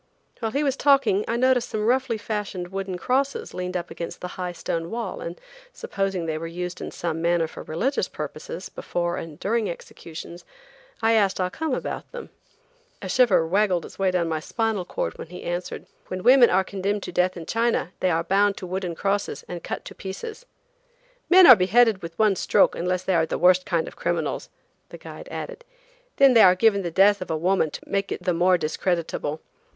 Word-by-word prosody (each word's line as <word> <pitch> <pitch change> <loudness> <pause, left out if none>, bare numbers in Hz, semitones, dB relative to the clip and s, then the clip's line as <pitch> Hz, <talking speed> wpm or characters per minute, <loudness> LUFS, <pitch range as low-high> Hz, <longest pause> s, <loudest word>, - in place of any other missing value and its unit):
While 225 - -1
he 280 +5 0
was 275 -2 +1
talking 270 -9 +3
I 230 - 0
noticed 255 -1 +2
some 215 -1 -2
roughly 250 -1 +1
fashioned 205 -4 -4
wooden 190 -1 -4
crosses 265 +9 -1
leaned 180 0 -3
up 175 0 -6
against 170 - -6
the 180 - -6
high 180 -1 -4
stone 165 -1 -4
wall, 230 -4 -4
and 170 +1 -6 0.3
supposing 195 - -3
they 155 -1 -2
were 165 - -5
used 180 +1 -5
in - - -4
some 165 -1 -4
manner 170 0 +2
for - - -10
religious 235 - -1
purposes - - -7
before 175 0 -3
and 155 -2 -8
during 225 +2 0
the - - -2
executions, 170 +1 -10 0.6
I 225 - +4
asked 205 -4 +2
Ah 185 0 0
Cum 315 0 -2
about - - -5
them. - - -9 0.7
A - - -6
shiver 220 -10 +4
waggled 185 -1 0 0.2
down 175 -2 0
my 160 -1 -1
spinal 220 +2 -2
cord - - -4
when - - -7
he 180 +2 -10
answered: 175 +1 -4 0.2
"When 185 0 -5
women 250 -1 +7
are 190 +1 +3
condemned 200 +1 -3
to - - -6
death 180 +1 +1
in 165 - -7
China 230 -4 0
they 185 - +1
are 165 -1 +1
bound 200 +3 +2
to - - -6
wooden 180 -1 -3
crosses 200 +3 -2
and 175 -1 -7
cut - - -5
to - - -8
pieces." 435 - -8 0.8
"Men 370 0 +8
are 255 - +11
beheaded 215 +2 +3
with 165 0 -8
one 215 -3 +3
stroke - - +3
unless 180 +1 -2
they 190 - 0
are 160 -2 +2
the - - -2
worst 180 +1 +4
kind 170 -2 0
of - - -9
criminals," - - -2 0.4
the - - -10
guide - - -10
added, - - -7 0.5
"then 275 -2 +6
they 230 - +7
are 185 -2 +7
given 200 0 +3
the 175 - -3
death 195 +3 +4
of 185 - -6
a 160 - 0
woman 175 0 +1
to - - -8
make 195 0 -2
it - - -4
the 180 -1 +1
more 180 +2 +3
discreditable. 160 -1 -2
185 Hz, 200 wpm, -24 LUFS, 175-225 Hz, 0.8 s, are